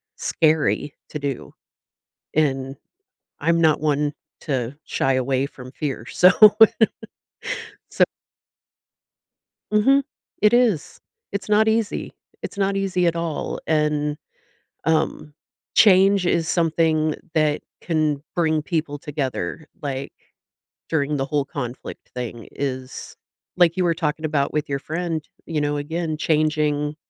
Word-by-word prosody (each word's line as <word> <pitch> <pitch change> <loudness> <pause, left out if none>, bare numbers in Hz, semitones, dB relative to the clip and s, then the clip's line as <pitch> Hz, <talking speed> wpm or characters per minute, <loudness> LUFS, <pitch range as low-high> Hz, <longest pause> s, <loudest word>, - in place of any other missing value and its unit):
scary 155 -2 +1 0.2
to 150 - -5
do, 140 -2 -4 0.8
and 135 -3 0 0.6
I'm 170 0 +2
not 155 -3 +3
one 150 -1 +1 0.3
to 130 -2 -2
shy 135 - +1
away 130 +1 +1
from 130 -2 -12
fear, 135 -6 -4
so 180 +1 +6 1.6
so - - +4 1.7
Mhm, 270 +7 +4 0.4
it 210 +1 +5
is, 235 - +2 0.3
it's 200 -2 -4
not 215 +1 +4
easy, 220 -1 -1 0.3
it's - - -7
not 195 0 +1
easy 190 -2 +1
at 170 - +1
all, 165 -3 -3
and, 150 -1 +1 0.7
um, 155 -1 0 0.4
change 195 -1 +6
is 170 -2 +1
something 160 -2 +2 0.2
that 155 -1 +2 0.2
can 155 -4 0
bring 160 -2 +2
people 150 -3 -2
together, 150 +1 -4
like, 135 -1 -4 0.8
during 150 -2 0
the 135 - -1
whole 145 0 0
conflict 130 -3 -7
thing 120 -2 -5
is 130 -2 -5 0.4
like, 175 -2 +4
you 185 - +1
were 170 -1 +2
talking 155 -1 -2
about 145 -3 0
with 150 -1 -1
your 140 - 0
friend, 160 +1 -3 0.2
you 160 -2 -1
know, 145 0 0
again, 160 +2 -2
changing 150 -1 +1
155 Hz, 120 wpm, -22 LUFS, 145-170 Hz, 1.7 s, so